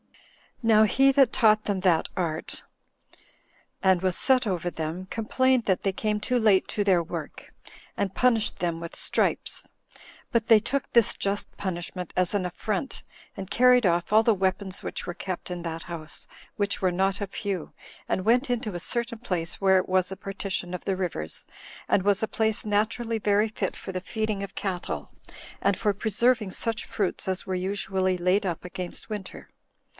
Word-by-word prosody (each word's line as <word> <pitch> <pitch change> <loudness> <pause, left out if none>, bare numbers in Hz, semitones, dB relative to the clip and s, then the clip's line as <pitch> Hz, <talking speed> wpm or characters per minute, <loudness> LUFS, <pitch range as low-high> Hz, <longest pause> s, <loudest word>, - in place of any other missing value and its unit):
Now 220 -1 +6
he 270 +6 +4
that 270 -3 +5
taught 215 -3 +4
them 200 -2 0
that 180 -3 +3
art, 165 -3 -3 1.2
and 190 -2 +4
was 185 -2 +1
set 260 -2 +4
over 180 -4 -1
them, 165 +3 -4
complained 255 +2 +1
that 190 -2 +1
they 195 - +2
came 210 +2 -1
too 250 +4 0
late 210 -4 +4
to 205 - 0
their 190 -4 +4
work, 165 - -7 0.4
and 195 -2 -1
punished 230 -4 +2
them 170 -2 -1
with 170 0 -7
stripes; - - 0 0.6
but 230 -3 +1
they 225 -3 +8
took 255 +5 -2
this 235 -3 +5
just 200 +1 -2
punishment 180 -1 -4
as 185 0 +1
an 200 -3 0
affront, 210 +7 -3 0.3
and 195 -1 -6
carried 250 -1 +5
off 175 0 +1
all 215 +1 +7
the 225 -2 +4
weapons 190 0 -1
which - - -5
were 175 - -3
kept 185 -1 -5
in 175 -1 -4
that 165 -1 -4
house, 160 -3 -6 0.3
which 200 -1 -1
were 185 -1 +3
not 195 +3 0
a 200 - -1
few, 195 -4 -4 0.3
and 185 - -1
went 245 +4 +3
into 235 -4 -1
a - - -3
certain 235 +4 -3
place 180 -8 -3
where 190 -1 +5
was 185 0 +1
a - - -3
partition 195 -2 -4
of 180 - -8
the 195 - +1
rivers, 165 - -4 0.4
and 190 - +2
was 200 0 +3
a - - +2
place 220 -1 0
naturally 225 +2 0
very 210 +1 +3
fit 210 -3 -3
for - - -7
the 185 -1 -3
feeding 215 0 -2
of 200 -1 -6
cattle, 175 - -4 0.5
and 200 -1 +1
for 210 -2 +1
preserving 225 +1 +1
such 230 +4 -2
fruits 195 -3 -2
as 185 -1 -1
were 190 - -1
usually 190 0 0
laid 185 +3 +2
up 175 0 -4
against 180 +3 -5
winter. 210 -3 -7
195 Hz, 180 wpm, -26 LUFS, 185-220 Hz, 1.2 s, they